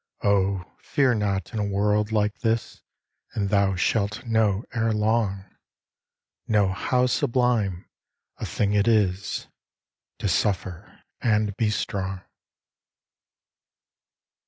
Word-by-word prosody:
Oh, 100 -2 +2
fear 135 -3 +2
not 100 -1 -1
in 110 - -2
a - - +1
world 105 +1 +1
like 105 -1 0
this, 115 -1 -1 0.5
And 100 -2 0
thou 100 -1 +2
shalt 110 +5 0
know 110 -3 +2
ere 115 -1 +1
long, 105 -2 +1 1.0
Know 105 -3 +3
how 125 +7 +1
sublime 120 -8 +1 0.5
a - - -4
thing 100 0 0
it 105 +1 +2
is 105 -4 +1 0.7
To - - -2
suffer 95 -3 -2 0.2
and 105 -3 +1
be 110 -1 +1
strong. 95 -2 -3
105 Hz, 110 wpm, -25 LUFS, 100-110 Hz, 1.0 s, Know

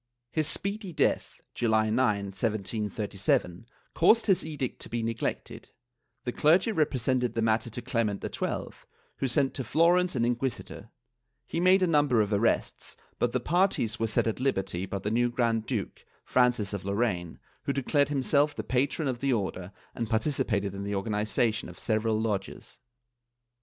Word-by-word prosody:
His 155 -2 +1
speedy 200 +2 -1
death - - 0
(July 110 -2 +2
9, 120 +4 +2 0.3
1737), 105 -2 -1 0.3
caused 230 +1 +4
his 195 -4 +3
edict 145 -5 -4
to - - -7
be 115 0 -2
neglected; 115 0 -4 0.5
the 125 - -2
clergy 170 - +3
repre 155 -8 +1
sented 125 -1 0
the 115 - 0
matter 115 +1 +1
to 120 +2 -7
Clement 110 -5 -1
XII, - - -3 0.5
who 135 - -1
sent 135 +2 +1
to 130 - -4
Florence 170 +7 +3
an 120 - +1
inquisi 120 +1 -1
tor; 110 - -11 0.6
he - - -3
made 185 +2 +5
a - - +5
number 145 -7 +3
of 105 -1 +1
arrests, 110 +3 0 0.2
but 120 - +1
the 130 - 0
parties 160 - +1
were 115 - +1
set 110 - +1
at 110 +1 -1
liberty 95 -8 -1
by 100 - -3
the 100 +2 -3
new 120 +2 +2
Grand 115 -2 0
duke, 110 -8 -4 0.2
Francis 120 -5 +2
of 100 - -4
Lorraine, 100 -4 -1 0.3
who - - +1
declared 140 +1 +1
him 140 -2 -1
self 145 +2 +2
the - - -4
patron 140 +4 0
of 125 -2 -2
the 140 +1 0
Order 95 -5 -2 0.2
and 115 -2 -4
participated 110 -4 0
in 100 0 -5
the 100 0 -2
organization 105 +2 0
of - - -12
several 110 0 0
lodges. 105 -2 -4
120 Hz, 170 wpm, -28 LUFS, 105-140 Hz, 0.6 s, made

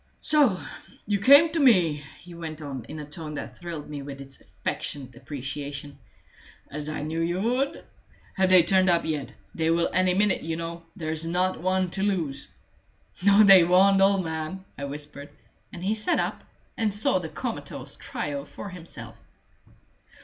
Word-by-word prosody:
"So 285 -12 +3 0.5
you 205 -1 0
came 285 +9 +7
to 330 - -1
me," 175 - +4 0.2
he 175 0 -12
went 160 -2 -7
on, 135 -6 -6
in 155 - -8
a 150 - -6
tone 150 0 -8
that - - -7
thrilled 170 -4 -6
me 145 -1 -6
with 140 0 -8
its 135 0 -12
affectionate 130 -4 -5
appreciation, 140 +2 -6 0.7
"as 150 +1 -4
I 155 -1 -4
knew 160 +2 -2
you 175 +2 -1
would! 250 +6 -1 0.5
Have 190 -1 +2
they 185 -2 +7
turned 185 +2 +3
up 170 -1 +2
yet? 150 -4 -3 0.2
They 160 0 0
will 170 +1 +2
any 185 0 +3
minute, 205 0 +2
you 165 0 -3
know; 170 0 -6
there's 160 0 -1
not 180 +2 0
one 185 0 0
to 190 - +1
lose." 180 -9 -1 0.7
"No, 200 +2 +7
they 195 -3 +9
won't, 190 +3 +5
old 195 -1 +4
man!" 160 +4 -5
I 140 - -5
whispered. 145 0 -7 0.4
And 175 - -8
he 200 +3 +1
sat 215 -1 +1
up - - -2 0.3
and 220 -2 0
saw 205 -2 +2
the 165 -3 -6
comatose - - -5
trio 140 -1 -5
for 200 - -9
himself. 120 - -10
170 Hz, 170 wpm, -26 LUFS, 150-190 Hz, 0.7 s, they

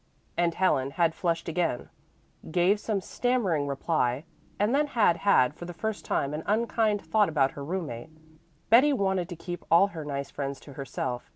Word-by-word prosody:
And 170 -1 +1
Helen 135 -8 +2
had 165 +3 +1
flushed 170 -1 -2
again, 165 -6 -1 0.6
gave 180 +5 +3
some 210 -2 -2
stammering 195 - 0
reply 140 -2 0 0.3
and 210 +4 +1
then 295 +2 +2
had 215 -10 +3
had 145 -11 +3
for 175 - -9
the 175 0 -8
first 220 +4 -4
time 140 +1 -1
an 150 - -3
unkind 215 -1 +1
thought 210 -4 +2
about 135 -4 +2
her 140 - -8
roommate. 155 -7 -4 0.6
Betty 270 +6 +7
wanted 190 -7 0
to 175 - -6
keep 175 +1 -7
all 170 +5 +5
her 160 -5 -7
nice 140 -1 -4
friends 140 -1 -4
to 140 - -12
herself. 130 -2 -4
170 Hz, 175 wpm, -27 LUFS, 140-205 Hz, 0.6 s, Betty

